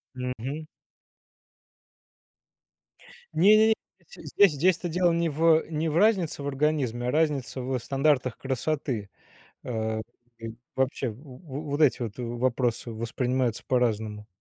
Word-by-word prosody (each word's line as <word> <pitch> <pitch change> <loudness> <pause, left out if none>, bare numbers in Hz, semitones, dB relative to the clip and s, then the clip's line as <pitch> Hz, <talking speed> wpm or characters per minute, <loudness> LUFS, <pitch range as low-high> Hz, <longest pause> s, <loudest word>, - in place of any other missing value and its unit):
Мгм. 130 +4 -4 2.7
Не-не-не, 215 +5 +6 0.3
здесь, 200 - +2
здесь-то 175 +3 +1
дело 175 +1 +2
не 170 0 +1
в, 155 +2 -3 0.2
э, - - -16
не 160 0 -1
в 155 - -1
разнице 190 -7 +2
в 140 - -4
организме, 135 -4 0
а - - +1
разница 145 -4 0
в 130 +1 -1
стандартах 135 0 +1
красоты. 130 -5 -2 0.6
А, 110 -2 -2 0.4
и 115 -1 -7 0.2
вообще, 130 0 0
в 105 - -10
во 140 +1 -8
вот 145 -1 -3
эти 135 -4 +3
вот 110 -4 -5
в 120 -1 -4
вопросы 120 -1 0
воспринимаются 120 +1 -1
по-разному. 110 -4 0
130 Hz, 125 wpm, -27 LUFS, 120-155 Hz, 2.7 s, Не-не-не